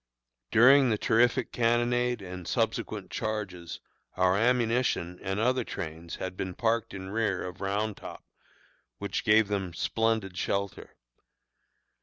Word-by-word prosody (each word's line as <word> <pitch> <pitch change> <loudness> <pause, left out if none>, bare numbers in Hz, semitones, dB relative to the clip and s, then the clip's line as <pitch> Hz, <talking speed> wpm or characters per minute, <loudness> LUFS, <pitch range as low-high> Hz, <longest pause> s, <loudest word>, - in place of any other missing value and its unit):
During 130 +3 +6
the 110 - +1
terrific 120 +3 +2
cannonade 120 0 +1
and 90 -2 -8
subsequent - - -2
charges, 95 -6 -4 0.4
our 90 0 +3
ammunition 115 -5 +1
and 95 +1 -2
other 125 +2 +2
trains 80 -3 -6
had 95 0 -5
been 95 -1 -4
parked 115 -2 0
in 95 0 -7
rear 105 -3 0
of 90 0 -8
Round 100 +2 -1
Top, - - -9 0.7
which - - -3
gave 110 0 +5
them 95 -4 -3
splendid 110 -2 0
shelter. 100 +1 -3
105 Hz, 125 wpm, -28 LUFS, 95-115 Hz, 0.7 s, During